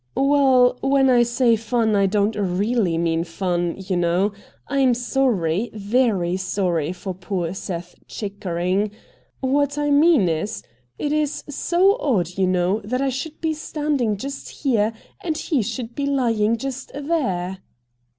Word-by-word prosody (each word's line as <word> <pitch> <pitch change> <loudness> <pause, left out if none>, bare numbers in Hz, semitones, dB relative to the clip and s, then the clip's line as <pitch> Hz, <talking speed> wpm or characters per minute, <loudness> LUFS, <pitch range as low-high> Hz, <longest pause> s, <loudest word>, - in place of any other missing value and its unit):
' 125 - -43
Well, 265 -3 +4
when 270 -1 +3
I 245 -1 +5
say 240 0 +3
fun 225 0 0
I 200 -1 +3
don't 205 +2 +1
really 200 -1 0
mean 165 0 +1
fun 175 0 -2
you 190 -1 -3
know. 175 +4 +1 0.3
I 275 - -1
am 255 -3 +4
sorry, 235 -7 0
very 205 -4 +1
sorry 180 -4 -1
for 185 +1 -5
poor 180 -2 -3
Seth 175 -2 -6
Chickering. 195 -1 -2 0.5
What 285 +2 +1
I 290 0 0
mean 290 - +5
is, 165 +6 -2 0.3
it 295 - -1
is 300 -1 -1
so 360 - +2
odd, 185 - 0
you 190 -1 +1
know, 185 +3 +1
that 250 +5 -2
I 275 - +1
should 295 +5 -5
be 320 -1 0
stand 300 -2 -2
ing 215 -3 +1
just 275 +6 -6
here, 225 -6 0 0.3
and 320 -3 -1
he 310 -5 0
should 235 +2 -4
be 280 +2 -2
lying 230 -5 +1
just 270 +1 -5
there 220 - -1
220 Hz, 155 wpm, -22 LUFS, 185-275 Hz, 0.5 s, I